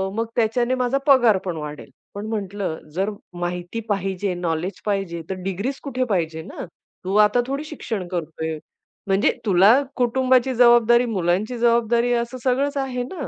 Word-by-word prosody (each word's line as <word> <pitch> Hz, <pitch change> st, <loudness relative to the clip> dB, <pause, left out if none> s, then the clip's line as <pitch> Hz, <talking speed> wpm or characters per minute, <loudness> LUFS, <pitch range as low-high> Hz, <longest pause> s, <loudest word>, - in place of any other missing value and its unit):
मग 225 Hz, 0 st, -1 dB
त्याच्याने 240 Hz, +2 st, +1 dB
माझा 255 Hz, +1 st, 0 dB
पगार 240 Hz, -7 st, +6 dB
पण 175 Hz, -3 st, -3 dB
वाढेल." 150 Hz, -1 st, -7 dB, 0.3 s
पण 205 Hz, -, -5 dB
म्हटलं, 200 Hz, -5 st, -3 dB, 0.2 s
"जर 195 Hz, +3 st, 0 dB, 0.3 s
माहिती 175 Hz, +5 st, -4 dB
पाहिजे, 195 Hz, -1 st, -1 dB
नॉलेज 175 Hz, +2 st, -3 dB
पाहिजे 195 Hz, -5 st, -2 dB
तर 190 Hz, -, -2 dB
डिग्रीज 200 Hz, +9 st, -3 dB
कुठे 255 Hz, -2 st, -2 dB
पाहिजे 160 Hz, -2 st, -1 dB
ना. -, -, -8 dB, 0.4 s
तू 195 Hz, +2 st, -1 dB
आता 245 Hz, +3 st, +1 dB
थोडी 275 Hz, +3 st, -3 dB
शिक्षण 200 Hz, -10 st, -4 dB
करतोय 160 Hz, -2 st, -4 dB, 0.5 s
म्हणजे 195 Hz, +1 st, +3 dB
तुला 205 Hz, +7 st, +5 dB, 0.2 s
कुटुंबाची 255 Hz, +1 st, +2 dB
जबाबदारी, 240 Hz, 0 st, +5 dB
मुलांची 195 Hz, +5 st, 0 dB
जबाबदारी 235 Hz, 0 st, +2 dB
असं 235 Hz, +2 st, -2 dB
सगळंच 280 Hz, +3 st, +1 dB
आहे 255 Hz, -2 st, -2 dB
ना. 285 Hz, +2 st, -6 dB
220 Hz, 150 wpm, -22 LUFS, 185-245 Hz, 0.5 s, पगार